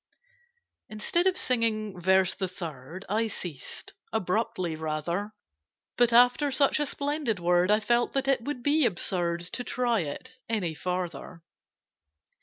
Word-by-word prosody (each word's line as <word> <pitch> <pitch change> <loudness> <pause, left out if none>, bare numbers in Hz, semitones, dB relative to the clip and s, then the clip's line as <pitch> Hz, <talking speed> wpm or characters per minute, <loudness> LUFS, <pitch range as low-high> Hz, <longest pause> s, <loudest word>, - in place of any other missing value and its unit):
Instead 280 - 0
of 375 -1 +2
singing 215 - 0
Verse 190 +1 +4
the 190 - -3
Third, 165 -1 -8
I 220 +3 +1
ceased—abruptly, 185 - -3
rather: 160 +6 -3 0.6
But, 240 -1 +3
after 245 +5 +5
such 280 +2 +3
a 295 - +1
splendid 285 -7 -1
word 175 +1 +2
I 210 +1 +5
felt 240 +2 +1
that 270 0 0
it 270 -3 +2
would 260 -2 -4
be 300 +2 +4
absurd 175 -3 0
To 245 - -2
try 245 -2 0
it 195 - -6
any 195 -8 -1
farther. 175 -1 -4
210 Hz, 130 wpm, -28 LUFS, 175-245 Hz, 0.6 s, after